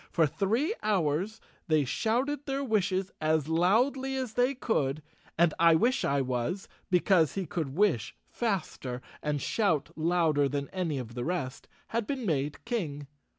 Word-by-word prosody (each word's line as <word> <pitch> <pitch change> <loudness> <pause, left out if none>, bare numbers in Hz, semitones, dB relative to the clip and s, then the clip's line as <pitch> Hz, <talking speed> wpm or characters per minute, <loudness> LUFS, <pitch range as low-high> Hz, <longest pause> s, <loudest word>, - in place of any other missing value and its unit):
For 165 - +3
three 225 - 0
hours 190 0 0 0.3
they 155 -3 +3
shouted 255 - -1
their 275 0 -1
wishes 195 -5 0
as 155 -1 +2
loudly 240 - +2
as 255 -4 -3
they 250 +3 +2
could, 150 - 0 0.3
and 170 -1 +4
I 165 -1 +6
wish 240 +10 +2
I 140 0 +2
was, 130 +9 -2 0.2
be¬ 180 -1 +3
cause 165 -7 +4
he 195 -1 -1
could 150 -4 -3
wish 160 - +1
faster 155 - -3 0.2
and 150 -1 -1
shout 165 - 0
louder 160 -3 +2
than 140 0 -3
any 175 -6 -2
of 120 -3 -6
the 120 0 -3
rest, 135 -6 -3 0.2
had 230 -2 -1
been 265 -4 -3
made 145 -4 -1
king. 165 - -3
175 Hz, 155 wpm, -29 LUFS, 145-220 Hz, 0.3 s, I